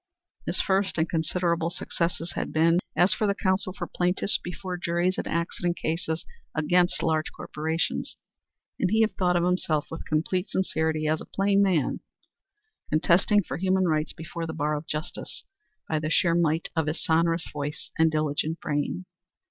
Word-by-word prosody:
His -, -, 0 dB
first 195 Hz, -1 st, +1 dB
and 160 Hz, +1 st, +2 dB
considerable 170 Hz, 0 st, 0 dB
successes 170 Hz, -1 st, -2 dB
had -, -, -3 dB
been 165 Hz, +2 st, +4 dB, 0.2 s
as 180 Hz, +3 st, +4 dB
the 205 Hz, -2 st, +2 dB
counsel 190 Hz, 0 st, 0 dB
for 185 Hz, -, -5 dB
plaintiffs 180 Hz, +3 st, +1 dB
before 180 Hz, +1 st, -5 dB
juries 175 Hz, +1 st, 0 dB
in -, -, -3 dB
accident 170 Hz, +1 st, -1 dB
cases 160 Hz, 0 st, -2 dB, 0.3 s
against 175 Hz, +3 st, +2 dB
large 155 Hz, -1 st, +1 dB
corporations, 160 Hz, +2 st, -3 dB, 0.6 s
and 185 Hz, -, +2 dB
he 220 Hz, +3 st, +3 dB
had 220 Hz, -, +2 dB
thought 180 Hz, -1 st, +2 dB
of 175 Hz, -, +3 dB
himself 175 Hz, -4 st, 0 dB
with 160 Hz, -, -6 dB
complete 180 Hz, +5 st, 0 dB
sincerity 160 Hz, -4 st, 0 dB
as 155 Hz, 0 st, +1 dB
a -, -, -7 dB
plain 200 Hz, 0 st, +2 dB
man, 180 Hz, -8 st, +2 dB, 0.9 s
contesting 180 Hz, +6 st, +4 dB
for 135 Hz, -, -4 dB
human 190 Hz, +1 st, +2 dB
rights 155 Hz, -1 st, +1 dB
before 165 Hz, +1 st, -6 dB
the 160 Hz, -, -4 dB
bar 150 Hz, -1 st, 0 dB
of 150 Hz, +2 st, -5 dB
justice, 155 Hz, +3 st, -5 dB, 0.4 s
by 155 Hz, -, 0 dB
the 155 Hz, 0 st, -2 dB
sheer 170 Hz, 0 st, +3 dB
might 165 Hz, -1 st, +1 dB
of 160 Hz, -2 st, +1 dB
his 155 Hz, +2 st, -1 dB
sonorous 165 Hz, +1 st, +2 dB
voice 145 Hz, +1 st, -5 dB
and 160 Hz, 0 st, +6 dB
diligent 155 Hz, +1 st, -1 dB
brain. 150 Hz, +4 st, -2 dB
170 Hz, 165 wpm, -27 LUFS, 155-180 Hz, 0.9 s, and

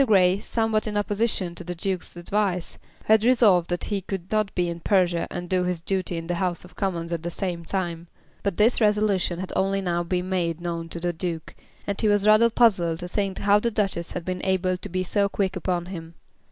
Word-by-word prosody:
Grey, 190 Hz, -3 st, +4 dB
somewhat 225 Hz, 0 st, 0 dB
in 210 Hz, -1 st, -2 dB
opposition 205 Hz, -3 st, 0 dB
to -, -, -7 dB
the 175 Hz, +1 st, -5 dB
Duke's 185 Hz, +1 st, -3 dB
advice, 180 Hz, 0 st, -1 dB, 0.3 s
had 220 Hz, 0 st, +5 dB
resolved 220 Hz, -8 st, +4 dB
that 175 Hz, 0 st, -1 dB
he 205 Hz, -2 st, -2 dB
could 190 Hz, -1 st, -6 dB
not 215 Hz, -2 st, +1 dB
be 175 Hz, -1 st, +1 dB
in 170 Hz, 0 st, -4 dB
Persia 175 Hz, -1 st, +2 dB
and 175 Hz, -, -5 dB
do 185 Hz, 0 st, +1 dB
his 180 Hz, -1 st, -1 dB
duty 185 Hz, 0 st, -1 dB
in 165 Hz, -, -5 dB
the 175 Hz, -, -2 dB
House 180 Hz, -2 st, -1 dB
of 180 Hz, -, -17 dB
Commons 175 Hz, -4 st, -2 dB
at 165 Hz, -, -2 dB
the 170 Hz, -, -3 dB
same 175 Hz, -1 st, -3 dB
time. 175 Hz, -2 st, -3 dB, 0.3 s
But 200 Hz, -4 st, -2 dB
this 230 Hz, +3 st, +3 dB
resolution 210 Hz, -4 st, +2 dB
had 185 Hz, +1 st, -5 dB
only 195 Hz, +1 st, +1 dB
now 175 Hz, -3 st, 0 dB
been 180 Hz, +1 st, -2 dB
made 175 Hz, -3 st, -1 dB
known 170 Hz, -1 st, -4 dB
to 170 Hz, -, -4 dB
the 175 Hz, +1 st, -1 dB
Duke, 165 Hz, -2 st, -4 dB, 0.3 s
and 200 Hz, -1 st, -2 dB
he 220 Hz, -, +2 dB
was 205 Hz, -1 st, +3 dB
rather 215 Hz, +2 st, +6 dB
puzzled 190 Hz, -9 st, +3 dB
to 175 Hz, -, -6 dB
think 195 Hz, +1 st, -2 dB
how 205 Hz, +1 st, +4 dB
the 235 Hz, -, 0 dB
Duchess 195 Hz, -6 st, -1 dB
had 175 Hz, -2 st, -5 dB
been 185 Hz, -1 st, -3 dB
able 185 Hz, -1 st, +1 dB
to 180 Hz, -, -7 dB
be 185 Hz, +1 st, -1 dB
so 200 Hz, +2 st, +1 dB
quick 195 Hz, -1 st, -1 dB
upon 180 Hz, -1 st, -1 dB
him. 165 Hz, -3 st, -8 dB
185 Hz, 220 wpm, -25 LUFS, 175-205 Hz, 0.3 s, rather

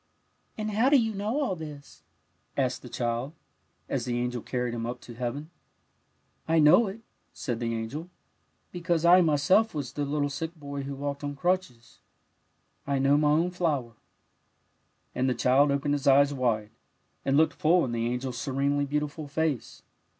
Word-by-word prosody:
'' -, -, -43 dB
And 215 Hz, 0 st, -3 dB
how 225 Hz, +6 st, +3 dB
do 285 Hz, -, +6 dB
you 225 Hz, -2 st, 0 dB
know 210 Hz, +7 st, -2 dB
all 225 Hz, -10 st, 0 dB
this? 150 Hz, -3 st, -10 dB, 0.6 s
'^ -, -, 0 dB
asked -, -, 0 dB
the -, -, -10 dB
child, 120 Hz, +4 st, -2 dB, 0.5 s
as -, -, -2 dB
the 120 Hz, -1 st, -1 dB
angel 125 Hz, 0 st, -2 dB
carried 125 Hz, 0 st, -2 dB
him 115 Hz, -1 st, -3 dB
up 125 Hz, +1 st, -5 dB
to 120 Hz, -, -11 dB
heaven. 125 Hz, +4 st, -4 dB
'^ -, -, -16 dB, 1.0 s
I 165 Hz, +1 st, +2 dB
know 160 Hz, +9 st, +6 dB
it," 200 Hz, +4 st, -7 dB, 0.3 s
said 120 Hz, -4 st, -4 dB
the 115 Hz, -1 st, -2 dB
angel, 140 Hz, +10 st, -5 dB, 0.3 s
'' -, -, -44 dB
because 170 Hz, -2 st, -1 dB
I 180 Hz, +2 st, +8 dB
m^^self 165 Hz, +7 st, +3 dB
was 140 Hz, -4 st, -4 dB
the 145 Hz, -, -2 dB
little 145 Hz, 0 st, -1 dB
sick 160 Hz, +4 st, -4 dB
boy 140 Hz, -2 st, -6 dB
who 140 Hz, 0 st, -5 dB
walked 140 Hz, +1 st, -4 dB
on 145 Hz, 0 st, -3 dB
crutches; 140 Hz, -8 st, -2 dB, 0.9 s
I 140 Hz, -1 st, +1 dB
know 135 Hz, +1 st, +3 dB
my 150 Hz, 0 st, +3 dB
own 165 Hz, +4 st, +2 dB
flower." 150 Hz, -10 st, -1 dB, 1.2 s
And 130 Hz, +1 st, 0 dB
the 125 Hz, -, 0 dB
child 135 Hz, +3 st, +4 dB
opened 140 Hz, +1 st, 0 dB
his 145 Hz, -2 st, -2 dB
eyes 140 Hz, +1 st, +5 dB
wide, 115 Hz, -5 st, -1 dB, 0.5 s
and 135 Hz, +1 st, +2 dB
looked 160 Hz, +1 st, +4 dB
full 170 Hz, +3 st, +3 dB
in 125 Hz, -, -4 dB
the 115 Hz, 0 st, -1 dB
angel's 125 Hz, 0 st, -3 dB
serenely 140 Hz, +2 st, 0 dB
beautiful 150 Hz, +1 st, -3 dB
face. 150 Hz, -3 st, -2 dB
145 Hz, 180 wpm, -27 LUFS, 125-160 Hz, 1.2 s, I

